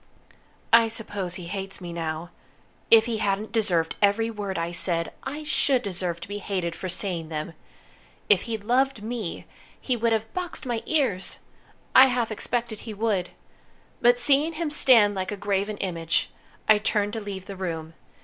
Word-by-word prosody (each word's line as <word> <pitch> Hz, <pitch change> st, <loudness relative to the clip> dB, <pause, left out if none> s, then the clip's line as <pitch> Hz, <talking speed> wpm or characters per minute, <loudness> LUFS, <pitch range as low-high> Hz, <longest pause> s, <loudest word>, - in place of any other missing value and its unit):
I 230 Hz, 0 st, +8 dB
suppose 205 Hz, -5 st, -3 dB
he 180 Hz, -, -7 dB
hates 195 Hz, +2 st, -4 dB
me 175 Hz, -2 st, -7 dB
now. 165 Hz, +1 st, -4 dB, 0.6 s
If 225 Hz, -1 st, +7 dB
he 230 Hz, -2 st, -2 dB
hadn't 205 Hz, 0 st, -1 dB
deserved 180 Hz, -8 st, +1 dB
every 215 Hz, +3 st, +3 dB
word 205 Hz, -3 st, -4 dB
I 165 Hz, +1 st, -2 dB
said, 170 Hz, -1 st, 0 dB
I 290 Hz, +3 st, -4 dB
should 275 Hz, -3 st, +2 dB
deserve 180 Hz, -4 st, -2 dB
to -, -, -7 dB
be 205 Hz, +1 st, -5 dB
hated 180 Hz, -5 st, -2 dB
for 185 Hz, -, -5 dB
saying 175 Hz, -3 st, -2 dB
them. 155 Hz, +1 st, -4 dB, 0.7 s
If 195 Hz, -3 st, +5 dB
he'd 220 Hz, -3 st, -3 dB
loved 250 Hz, 0 st, +1 dB
me, 220 Hz, -5 st, -4 dB, 0.3 s
he 255 Hz, -, -1 dB
would 230 Hz, 0 st, +1 dB
have 220 Hz, 0 st, -1 dB
boxed 360 Hz, -5 st, -4 dB
my 240 Hz, -3 st, -2 dB
ears! 265 Hz, -, +1 dB, 0.6 s
I 260 Hz, -, +10 dB
half 245 Hz, -3 st, 0 dB
expected 230 Hz, 0 st, -2 dB
he 220 Hz, -2 st, -7 dB
would. 200 Hz, -4 st, 0 dB, 0.7 s
But 240 Hz, 0 st, +5 dB
seeing 285 Hz, +6 st, +3 dB
him 320 Hz, -1 st, -3 dB
stand 230 Hz, -8 st, +6 dB
like 190 Hz, 0 st, -3 dB
a 205 Hz, -, -4 dB
graven 205 Hz, +1 st, -1 dB
image, 170 Hz, -3 st, -1 dB, 0.4 s
I 215 Hz, -1 st, +6 dB
turned 210 Hz, -1 st, 0 dB
to 225 Hz, -, -3 dB
leave 195 Hz, -2 st, -6 dB
the 195 Hz, -, -7 dB
room. 165 Hz, -4 st, -4 dB
205 Hz, 170 wpm, -26 LUFS, 180-230 Hz, 0.7 s, I